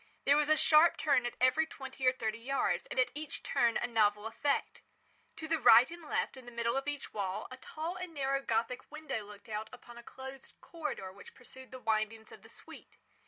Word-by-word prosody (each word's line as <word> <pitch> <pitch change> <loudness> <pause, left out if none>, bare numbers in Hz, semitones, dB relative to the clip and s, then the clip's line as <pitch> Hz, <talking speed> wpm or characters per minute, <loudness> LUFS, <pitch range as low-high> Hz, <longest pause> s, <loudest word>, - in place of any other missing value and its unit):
There 280 - +6
was 300 0 +2
a 310 - +5
sharp 315 +2 +6
turn 275 -5 +2
at - - -7
every 255 +6 +3
twenty 265 -3 -5
or - - +7
thirty 230 -3 -3
yards, 270 +4 -1
and - - -3
at 255 - +3
each 300 0 -5
turn 235 -1 +2
a - - -1
novel 210 -3 +2
effect. 275 +6 -1 0.5
To 315 - -7
the 325 0 +1
right 245 +2 +7
and 340 0 -9
left, 305 - -2
in 260 -2 -12
the - - -8
middle 235 0 -1
of 270 +1 -2
each 290 -1 -5
wall, 195 -3 -3
a 255 - -8
tall 320 +6 -5
and 365 -1 -6
narrow 275 -2 -1
Gothic 235 +1 -2
window 305 -8 -4
looked 205 +1 -13
out 215 0 -4
upon 240 -1 -12
a - - -12
closed 265 +2 -10
corridor 300 - -5
which 200 - -14
pursued 260 0 -13
the 260 - -8
windings 220 -1 -2
of - - -13
the - - -16
suite. - - -13
255 Hz, 215 wpm, -32 LUFS, 225-290 Hz, 0.5 s, or